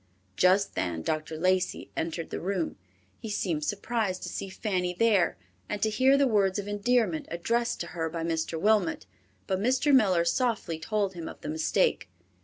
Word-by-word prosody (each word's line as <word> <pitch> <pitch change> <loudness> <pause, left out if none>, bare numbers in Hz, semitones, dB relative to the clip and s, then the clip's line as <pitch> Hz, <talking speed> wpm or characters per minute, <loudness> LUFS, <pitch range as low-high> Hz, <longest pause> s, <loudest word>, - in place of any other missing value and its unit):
Just 190 +2 +3
then 85 -3 -2
Dr. 155 - -2
Lacey 185 +2 0
entered 165 0 -3
the - - -3
room. 185 -2 -2 0.4
He 220 - -7
seemed 170 -7 -1
surprised 205 +1 -2
to - - -4
see 195 - -5
Fanny 185 -3 -2
there, 205 -3 +3 0.3
and 210 - -2
to 220 - +2
hear 265 +5 +4
the 280 - +4
words 200 -6 +2
of 205 0 -4
endearment 205 -4 +1
addressed 230 +8 -1
to - - -3
her 165 -2 -2
by 165 0 -4
Mr. 165 0 -2
Wilmot, 205 - +2 0.4
but 190 - -1
Mr. 260 +7 +2
Miller 190 -9 +4
softly 210 -4 0
told 205 +2 -1
him 170 -2 -6
of - - -11
the 150 - -5
mistake. 155 - +1
190 Hz, 175 wpm, -28 LUFS, 165-215 Hz, 0.4 s, hear